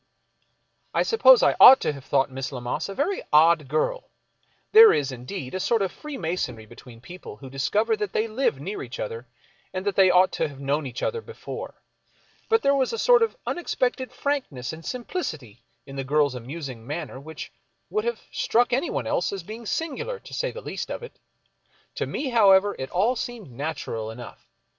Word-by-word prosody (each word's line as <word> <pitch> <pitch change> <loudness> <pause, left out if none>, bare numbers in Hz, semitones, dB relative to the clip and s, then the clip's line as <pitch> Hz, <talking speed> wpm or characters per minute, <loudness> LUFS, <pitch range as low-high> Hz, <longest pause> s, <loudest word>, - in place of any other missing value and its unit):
I - - +3
suppose - - +6
I - - +4
ought 265 - +11
to - - 0
have 140 -2 -10
thought 135 0 +1
Miss 135 +1 -5
Lammas 125 +7 -4
a 195 - -6
very 355 +8 -1
odd 155 -1 +5
girl. 155 - -1 0.6
There 445 +1 +10
is, 140 -2 0
indeed, 130 +3 -7
a 185 - -2
sort 225 +2 +1
of 190 - -2
freemasonry 170 - -4
between 120 +1 -14
people 175 - -10
who 130 +3 -11
discover 210 - +1
that 210 -2 -3
they 220 - 0
live 220 - 0
near 190 +9 -5
each 125 -1 -8
other 115 +3 -5 0.4
and 185 +1 -5
that 200 - 0
they 190 -1 +6
ought 180 +1 +5
to - - -1
have 140 -2 -12
known 140 +1 -1
each 125 0 -6
other 460 - -1
before. 460 0 -9 0.7
But 450 0 +3
there 280 - +4
was 270 -2 +1
a 460 - -3
sort 485 0 +5
of 455 +2 0
unexpected 260 -6 -2
frankness 255 - -3
and 160 +1 -10
simplicity 160 - -5 0.2
in 135 0 -10
the 135 - -2
girl's 145 0 +2
amusing 130 -2 -7
manner 150 -3 -5
which 160 +3 -9 0.4
would 430 +1 0
have 475 +1 -2
struck 245 +1 +1
anyone 270 +7 -1
else - - 0
as 195 -3 -5
being 220 +4 -9
singular, 335 - -3
to - - -14
say - - -1
the 485 - -8
least - - -5
of - - -5
it. 480 - -11 0.7
To - - -3
me, 280 - -3
however, 205 -4 +5
it 130 - -4
all 210 +8 +1
seemed 230 - -6
natural 120 -5 -4
enough. 115 +1 -11
180 Hz, 190 wpm, -25 LUFS, -, 0.7 s, ought